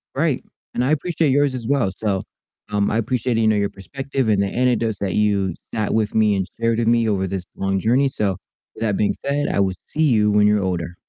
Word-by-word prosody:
Right, - - 0 0.3
and 125 - 0
I 130 - +1
appreciate 155 0 +1
yours 140 0 +2
as 120 -3 -5
well, 135 -8 +2
so, 100 0 -1 0.5
um, 105 -1 +1
I 110 - +1
appreciate, 120 +1 0
you 110 - +3
know, 110 - +3
your 100 -1 +1
perspective 130 +6 -3
and 100 -2 +3
the 100 - +1
anecdotes 115 -2 0
that 95 -3 -2
you 100 -4 +1 0.2
sat 110 -2 -1
with 110 -1 0
me 105 -2 +4
and 95 -1 -1
shared 115 0 +1
with 115 - 0
me 115 -1 +3
over 95 -2 0
this 95 -1 -4
long 95 0 -1
journey, 125 +7 +3
so 100 -7 -1 0.4
with - - -12
that 105 -3 0
being 105 - +1
said, 145 +1 0
I - - 0
will 95 -1 +2
see 160 - -4
you 105 -7 +3
when 105 0 +4
you're 105 -1 +2
older. 90 -2 -3
110 Hz, 235 wpm, -21 LUFS, 100-125 Hz, 0.5 s, me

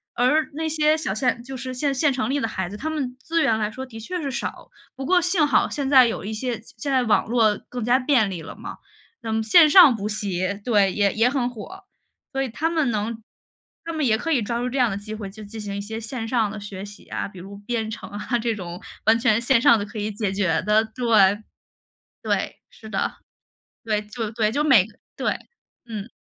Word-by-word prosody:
而 255 +6 +2
那 320 +1 -2
些 310 0 +2
小 310 -11 -2
县 240 0 0
就 265 +1 -8
是 255 0 -5
县 280 +1 0
县 285 +1 +2
城 260 0 -1
里 285 +1 +1
的 225 - 0
孩 190 -4 -3
子， 205 - -8
他 310 +8 -4
们 270 -5 -3
资 330 +5 0
源 220 - +3
来 210 0 0
说 260 +3 -6
的 225 -3 -10
确 360 +11 -4
是 280 -2 -3
少。 270 - -5 0.3
不 265 0 -6
过 360 +2 +4
幸 350 -3 +2
好 285 - +3
现 280 -2 -2
在 260 -4 +7
有 220 - -4
一 220 - -4
些 235 0 -3 0.2
现 280 +5 -3
在 260 -2 +3
网 215 -2 +2
络 225 -3 +3
更 245 -3 -4
加 245 +3 +3
便 250 -7 +2
利 170 -3 -5
了 160 - -9
嘛， - - -8 0.4
那 225 - -4
么 220 0 0
线 305 +8 +7
上 310 -7 +8
补 210 0 -3
习 200 -1 -2
对， 205 -5 +3
也 200 -2 +2
也 230 +3 +3
很 255 -3 0
火， 225 -4 -10 0.5
所 270 - 0
以 260 - -3
他 310 +8 -1
们 315 -6 +1
能 220 +2 -3 0.6
他 330 - -4
们 310 -3 0
也 220 -2 +3
可 330 +6 -3
以 260 -6 +3
抓 235 +3 -2
住 245 - -1
这 270 - -3
样 245 -3 +4
的 195 - -3
机 215 +1 -7
会 205 -3 -6
去 215 0 -10
进 220 +2 -9
行 200 -1 -5
一 - - -3
些 220 +2 -6
线 225 0 -5
上 225 -4 +1
的 215 - -6
学 200 -1 -7
习 205 0 -13
啊， - - -4
比 190 -2 -12
如 200 +2 -10
编 220 +1 -3
程 220 - -7
啊， 210 +4 -2
这 230 0 0
种 175 -2 -7 0.2
完 225 +1 +5
全 230 -3 +3
线 235 -1 +3
上 230 -3 +6
的 205 - -3
可 215 +1 -10
以 210 +1 -2
解 205 -2 -2
决 195 -3 +1
的， 210 +2 +3
对。 220 -3 +3 0.8
对， - - -1 0.2
是 220 - -13
的， 195 - -1 0.7
对， 215 -1 0
就 215 +1 -5
对， 215 -1 +1
就 295 +5 0
每 250 -11 +6 0.3
对， - - -1 0.5
嗯。 220 0 -6
225 Hz, 250 characters per minute, -23 LUFS, 210-265 Hz, 0.8 s, 上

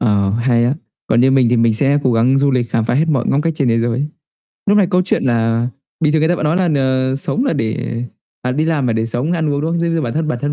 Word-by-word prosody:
Ờ, 100 -4 +1
hay 120 +2 +1
á, 130 +4 +1 0.3
còn 120 - +2
như 130 - +4
mình 135 -3 +3
thì 120 - +2
mình 115 -1 +2
sẽ 140 +4 +2
cố 130 - +1
gắng 125 +4 +2
du 140 0 +2
lịch 125 -3 -1
khám 115 - 0
phá 120 - -1
hết 155 +5 +1
mọi 135 -6 +1
ngóc 140 - +1
ngách 165 -1 0
trên 140 -4 0
thế 115 0 +2
giới. 120 +5 -1 0.6
Lúc 205 +1 +4
này 195 - +4
câu 180 0 +2
chuyện 185 - 0
là 115 -1 +1 0.4
bình 150 - +3
thường 155 - +2
người 160 - +2
ta 175 - +2
vẫn 165 - -3
nói 155 +3 +1
là 185 -2 +1
n 130 -3 0
sống 225 - -1
là 275 - 0
để 115 +1 -3 0.4
à, 125 - -1
đi 150 +4 0
làm 155 -5 0
là 115 - +1
để 110 0 -1
sống 125 +8 -1
ăn 160 -3 -1
uống, 145 0 -1
đúng 160 +2 -2
không? 170 - -1
Giống 170 0 0
như 165 - 0
bản 120 -5 -3
thân 155 +2 -2
bản 120 - -2
thân 145 - -1
130 Hz, 310 wpm, -17 LUFS, 115-155 Hz, 0.6 s, như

